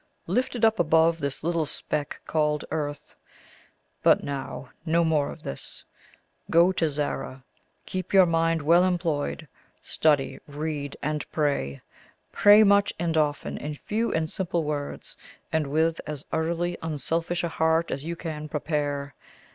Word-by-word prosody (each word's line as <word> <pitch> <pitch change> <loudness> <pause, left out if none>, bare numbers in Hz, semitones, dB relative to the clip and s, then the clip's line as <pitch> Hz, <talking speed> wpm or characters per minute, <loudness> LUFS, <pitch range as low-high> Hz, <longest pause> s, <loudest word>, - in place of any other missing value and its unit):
"Lifted 235 +4 +1
up 220 -1 +3
above 165 0 +4
this 140 -2 -3
little 165 -2 0
speck 145 +1 -4
called 150 -1 0
earth. 145 -2 -4 0.9
But - - +4
now, 135 -1 -5
no 170 +1 +2
more 155 -3 +2
of 160 - -12
this. 70 - -7 0.7
Go 170 +3 +5
to 165 -4 0
Zara; 140 -2 -3 0.4
keep 185 0 -4
your 190 -2 +7
mind 165 -1 +1
well 170 +4 +5
employed; 165 -4 -1 0.4
study, 145 -4 +1
read, 145 -1 -4
and 150 +1 -1
pray 140 - -1 0.5
pray 205 +1 +7
much 200 0 +4
and 165 -1 -1
often 150 -2 0
in 150 +1 -5
few 220 +9 -2
and 160 0 0
simple 170 -1 -2
words, 145 -1 -4 0.4
and 160 -2 +1
with 160 +3 +1
as 150 -2 -6
utterly 170 +2 -1
unselfish 165 +2 -2
a 170 - 0
heart 160 +1 +1
as 135 - -3
you 170 +2 -4
can 155 -3 -6
prepare. 145 -2 -2
160 Hz, 140 wpm, -26 LUFS, 145-170 Hz, 0.9 s, your